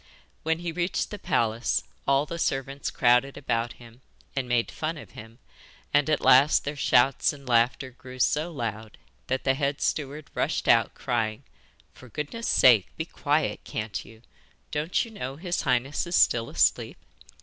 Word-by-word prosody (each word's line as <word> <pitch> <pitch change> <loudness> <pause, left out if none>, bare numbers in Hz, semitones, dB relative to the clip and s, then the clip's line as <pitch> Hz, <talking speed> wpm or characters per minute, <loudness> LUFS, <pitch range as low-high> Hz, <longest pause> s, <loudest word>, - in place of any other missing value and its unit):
When 160 0 0
he 170 0 -4
reached 175 +2 -2
the 210 - -6
palace 120 -11 0 0.2
all 140 +1 +3
the 170 +2 -6
servants 135 -1 -2
crowded 125 +3 +2
about 115 -3 -1
him, 120 +1 -16 0.3
and 130 -2 -2
made 120 -1 +1
fun 160 +1 -3
of - - -11
him, 110 +1 -12 0.6
and 145 +1 +3
at 155 - +2
last 140 +4 +5
their 145 +1 -3
shouts 135 0 +3
and 140 -2 -13
laughter 125 +2 +2
grew 130 0 -12
so 150 +6 +1
loud 110 -6 -5 0.3
that 130 +1 -1
the 135 - +3
head 140 0 -1
steward 145 0 -3
rushed - - -1
out, - - +4
crying, 115 -4 -2 0.5
'For 130 - -15
goodness 150 - -5
sake, 115 -7 +5
be 160 - -3
quiet, 145 -8 -1
can't 105 -1 -4
you. 110 +1 -16 0.5
Don't 155 +8 0
you 230 - -12
know 135 -11 -6
his 175 +3 -2
highness 130 +6 0
is 175 - -1
still 115 -1 +3
asleep? - - +1
135 Hz, 165 wpm, -26 LUFS, 120-150 Hz, 0.6 s, last